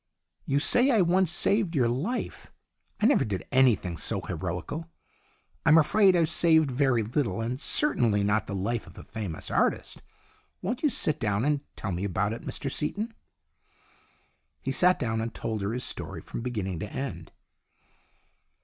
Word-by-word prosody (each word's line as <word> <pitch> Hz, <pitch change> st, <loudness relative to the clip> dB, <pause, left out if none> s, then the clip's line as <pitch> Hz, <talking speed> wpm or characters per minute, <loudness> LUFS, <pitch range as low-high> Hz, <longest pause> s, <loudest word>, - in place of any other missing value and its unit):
"You 140 Hz, -, +1 dB
say 245 Hz, -, +4 dB
I 225 Hz, -6 st, +4 dB
once 180 Hz, 0 st, +3 dB
saved 185 Hz, +1 st, +1 dB
your 125 Hz, -4 st, +3 dB
life. 150 Hz, -, -3 dB, 0.5 s
I -, -, +3 dB
never 275 Hz, +4 st, +4 dB
did 100 Hz, -4 st, -4 dB
anything 120 Hz, -10 st, +3 dB
so 75 Hz, -, -1 dB
heroical. 90 Hz, -, -5 dB, 0.7 s
I'm 155 Hz, -, +6 dB
afraid 190 Hz, +5 st, +5 dB
I've 165 Hz, -2 st, +3 dB
saved 160 Hz, -4 st, +4 dB
very 125 Hz, -3 st, +2 dB
little, 120 Hz, +2 st, -1 dB
and 120 Hz, +4 st, -3 dB
certainly 115 Hz, -, +2 dB
not 105 Hz, +1 st, +1 dB
the 100 Hz, -, -4 dB
life 110 Hz, +5 st, -2 dB
of -, -, -15 dB
a -, -, -9 dB
famous 100 Hz, -8 st, -6 dB
artist. -, -, 0 dB, 0.6 s
Won't 235 Hz, +7 st, -3 dB
you 300 Hz, -, +3 dB
sit 155 Hz, -, 0 dB
down 105 Hz, +1 st, 0 dB
and 145 Hz, -1 st, +1 dB
tell 95 Hz, -, -4 dB
me 90 Hz, +2 st, -3 dB
about 100 Hz, +2 st, -1 dB
it, 115 Hz, -, -7 dB
Mr 135 Hz, -, -4 dB
Seaton? 210 Hz, -, -3 dB, 0.7 s
" -, -, -37 dB
He -, -, -1 dB
sat 180 Hz, 0 st, +4 dB
down 110 Hz, -2 st, -1 dB
and 115 Hz, 0 st, -5 dB
told 110 Hz, -2 st, -3 dB
her 100 Hz, +2 st, -1 dB
his 125 Hz, +2 st, -3 dB
story, -, -, -4 dB
from -, -, -6 dB
beginning 105 Hz, -8 st, -3 dB
to 105 Hz, 0 st, -6 dB
end. 95 Hz, -12 st, -5 dB
125 Hz, 165 wpm, -27 LUFS, 105-165 Hz, 0.7 s, I'm